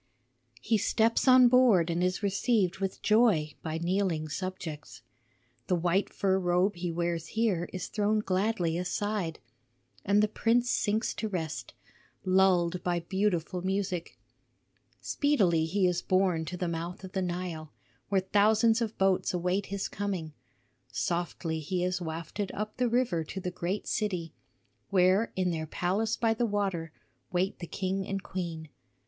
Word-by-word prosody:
"He 220 -2 +2
steps 225 +5 +2
on 255 -1 +8
board 235 -9 +5
and 170 +2 0
is 185 +3 0
received 200 -1 +1
with 195 -1 -3
joy 210 -10 +3
by 160 0 -3
kneeling 170 -2 0
subjects. 160 -7 -6 0.6
The 180 - +2
white 175 +3 +1
fur 190 -1 +1
robe 180 +2 +2
he 175 0 -3
wears 170 -1 -2
here 195 -7 +1
is 185 -2 -4
thrown 210 0 0
gladly 185 -4 0
aside, 180 -1 -2 0.7
and 205 +1 +3
the - - +4
prince 235 +3 +1
sinks 215 +1 0
to 220 - -3
rest, 165 -5 -4 0.5
lulled 185 -2 +3
by 175 -1 0
beautiful 185 -1 -1
music. 185 -2 -2 0.8
Speedily 195 - +2
he 190 +4 +1
is 180 -1 +1
borne 185 -4 +1
to 180 +3 -5
the 180 - -2
mouth 170 +3 -4
of 190 - -8
the 190 - -1
Nile, 175 -3 -4 0.4
where 195 -1 +2
thousands 215 +4 +3
of 225 -1 -2
boats 190 -1 +2
await 180 +3 0
his 200 0 -3
coming. 190 -6 -4 0.6
Softly 170 -1 -2
he 175 +4 -2
is 180 0 -1
wafted 165 +4 -4
up 215 +1 -4
the 250 -1 +1
river 235 -9 +1
to 190 - -6
the 180 -1 -4
great 180 +3 -3
city, 180 -7 -2 0.6
where 190 +3 +3
in 185 -1 +1
their 160 -1 -3
palace 200 +8 -1
by 225 -2 +2
the 235 +1 0
water 195 -6 -1 0.4
wait 185 +2 0
the 170 - -6
king 190 +2 -2
and 195 -1 -3
queen. 165 -4 -5
185 Hz, 150 wpm, -29 LUFS, 170-205 Hz, 0.8 s, on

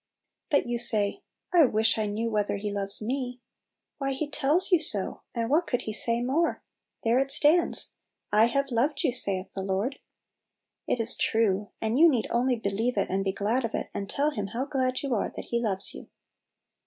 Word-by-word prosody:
But 285 - +2
you 240 0 -2
say, 215 -4 +1 0.3
"I 335 -4 +7
wish 220 -2 +2
I 215 - 0
knew 225 +3 -2
whether 205 -1 0
He 205 +1 -4
loves 200 +1 -2
me! 250 +1 -3 0.3
" - - -58
"Why, 275 -1 -1
He 290 +3 -3
tells 300 +6 +2
you 355 - +6
so; 210 - 0
and 230 -1 -1
what 315 +7 +2
could 245 - -1
He 215 - -4
say 230 +2 0
more? 300 +7 0 0.4
There 235 +1 +3
it 270 0 0
stands 305 +5 +2
— - - -55
" - - -51
I - - +7
have 275 +3 -1
loved 260 +6 0
you, 245 - +1
saith 195 -6 +1
the 195 - -4
Lord." 195 +8 -2 0.9
It - - 0
is 230 +1 +4
true, 205 -3 +1
and 225 +4 0
you 335 +1 +8
need 250 -7 +1
only 250 +2 +2
believe 225 +3 -2
it, - - 0
and 195 +1 0
be 195 - 0
glad 215 +6 -1
of 230 - -2
it, - - -4
and 200 0 -5
tell 290 +2 0
Him 205 -8 -4
how 235 +6 -3
glad 260 -2 -1
you 275 -3 -1
are 215 - 0
that - - -8
He 235 0 +1
loves 195 -5 -2
you. - - -10
235 Hz, 215 wpm, -27 LUFS, 210-275 Hz, 0.9 s, you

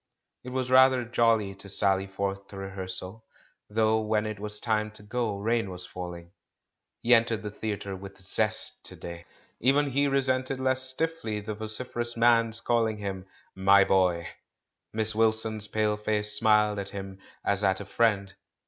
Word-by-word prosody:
It 125 - -7
was 130 0 -3
rather 130 -1 +6
jolly 115 -4 +2
to 100 +1 -11
sally 95 0 +2
forth 100 0 -4
to 100 - -11
rehearsal, 95 +2 -5 0.5
though 110 +1 +2
when 110 0 0
it 110 -1 -5
was 105 0 -2
time 110 -2 0
to 110 - -12
go, 110 -1 -2
rain 115 +1 0
was 90 -1 -7
falling. 90 -1 -8 0.7
He 120 - +5
entered 115 -2 +3
the 105 - -5
theatre 105 -2 -4
with 100 +1 -10
zest 105 +3 +1
to - - -6
day. 85 0 -9 0.3
Even 140 +3 +2
he 140 +2 +2
resented 130 -1 0
less 130 0 +1
stiffly 130 -4 -1
the 105 +1 -5
vociferous 120 +2 -4
man's 115 -1 +3
calling 115 -2 +1
him 95 -2 -5 0.3
"my 100 +1 +5
boy." 90 -3 +2 0.6
Miss 110 0 -1
Wilson's 110 -1 +1
pale 105 0 0
face 105 0 +1
smiled 105 -1 +4
at 100 0 -5
him 95 -1 -8 0.3
as 100 0 +1
at 95 -1 +2
a 100 - -7
friend. 100 -2 +1
105 Hz, 160 wpm, -27 LUFS, 100-115 Hz, 0.7 s, rather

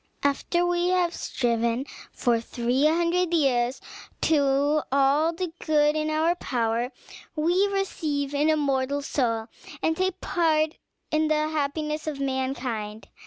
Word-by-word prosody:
After 315 +5 +1
we 350 0 +1
have 360 -2 +2
striven 235 -1 -1 0.3
for 235 -2 +1
three 245 +4 0
hundred 340 +2 +1
years 255 -4 +1 0.4
to 285 0 +2
all 280 +4 +3
the 335 0 -4
good 300 -1 +3
in 310 0 0
our 315 +2 +2
power, 235 -2 -1 0.4
we 350 +6 +2
receive 310 -8 -2
an 295 +2 +2
immortal 285 -2 +1
soul 230 -6 0 0.3
and 320 - +1
take 375 +1 -1
part 315 -3 +1 0.4
in 310 0 +2
the 305 0 +1
happiness 305 +1 -2
of 295 -3 -3
mankind. 260 -5 -3
300 Hz, 125 wpm, -26 LUFS, 265-325 Hz, 0.4 s, all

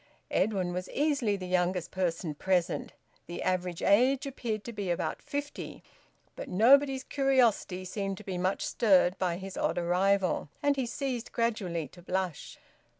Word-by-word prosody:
Edwin 185 -5 +1
was 180 +1 -4
easily 280 -8 +1
the 185 - -6
youngest 180 -1 0
person 170 -3 -1
present 180 +3 0 0.3
the 175 - -5
average 180 -2 -1
age 255 +7 +4
appeared 230 -6 -3
to 235 - -7
be 200 -4 -4
about 175 - -2
fifty 285 +1 -5 0.5
but - - -7
nobody's 265 +7 +5
curiosity 245 -9 +2
seemed 195 +1 -3
to 215 - -10
be 185 -3 -4
much 185 +2 0
stirred 190 -5 +4
by 175 -2 0
his 190 0 -8
odd 165 - 0
arrival, 180 0 +1
and 285 0 +3
he 265 -3 -1
ceased 255 -3 -3
gradually 195 -9 -1
to 175 - -15
blush. 185 -3 -3
195 Hz, 150 wpm, -30 LUFS, 180-240 Hz, 0.5 s, nobody's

